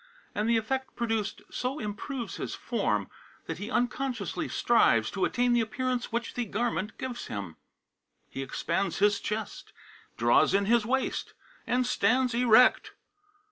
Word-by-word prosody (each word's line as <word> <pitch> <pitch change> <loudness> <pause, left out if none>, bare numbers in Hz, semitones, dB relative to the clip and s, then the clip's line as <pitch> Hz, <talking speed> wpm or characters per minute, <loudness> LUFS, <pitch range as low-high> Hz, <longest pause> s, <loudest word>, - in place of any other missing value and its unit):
And 210 +2 0
the 235 - +4
effect 265 +4 -2
produced 225 -3 -2
so 255 +3 -2
improves 235 +2 -5
his - - -4
form - - -1 0.4
that - - -5
he 205 - -5
unconsciously 250 +1 -1
strives - - +3
to - - 0
attain 245 -1 +1
the 240 - +4
appearance 250 +2 -2
which 235 +1 -2
the 245 - -1
garment 210 -2 -2
gives 250 -2 -5
him; 100 -6 -5 0.7
he 135 - -6
expands 170 +8 -2
his 205 +1 +3
chest, 210 0 -5 0.4
draws 120 - +4
in 200 0 +2
his 225 0 +3
waist, 265 +2 -1 0.3
and 250 +1 +2
stands 250 +2 +2
erect." 245 0 +5
235 Hz, 140 wpm, -29 LUFS, 210-250 Hz, 0.7 s, erect